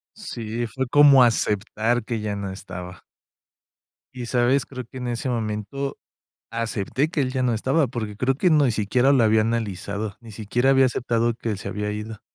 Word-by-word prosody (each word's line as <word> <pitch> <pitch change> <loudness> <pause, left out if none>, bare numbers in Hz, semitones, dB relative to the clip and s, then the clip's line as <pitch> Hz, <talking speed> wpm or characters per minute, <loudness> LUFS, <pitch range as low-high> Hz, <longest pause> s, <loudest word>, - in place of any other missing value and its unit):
Sí, 120 - -4
fue 130 +4 -3
como 140 -1 +7
aceptar 110 +1 +1
que 115 0 -3
ya 105 -1 -3
no 100 -1 -4
estaba 90 -1 -9 1.1
y, 125 -2 -6
¿sabes?, 125 +3 +2
creo 130 -2 -7
que 130 - -11
en 125 -1 -4
ese 120 +2 -2
momento, 115 +4 -3 0.5
acepté 115 +4 -1
que 165 - -1
él 130 -2 0
ya 130 -1 -1
no 125 -2 +2
estaba, 135 +7 +1
porque 110 -4 -5
creo 130 +4 +1
que 180 +5 +2
ni 145 -5 +4
siquiera 120 +5 +2
lo 130 -4 +4
había 110 0 +4
analizado. 105 -2 -2
Ni 115 -2 -12
siquiera 110 +5 0
había 135 -1 +5
aceptado 120 -1 0
que 115 0 -4
él 105 - -3
se - - -6
había 105 0 -3
ido. 105 +1 -6
115 Hz, 185 wpm, -23 LUFS, 105-130 Hz, 1.1 s, como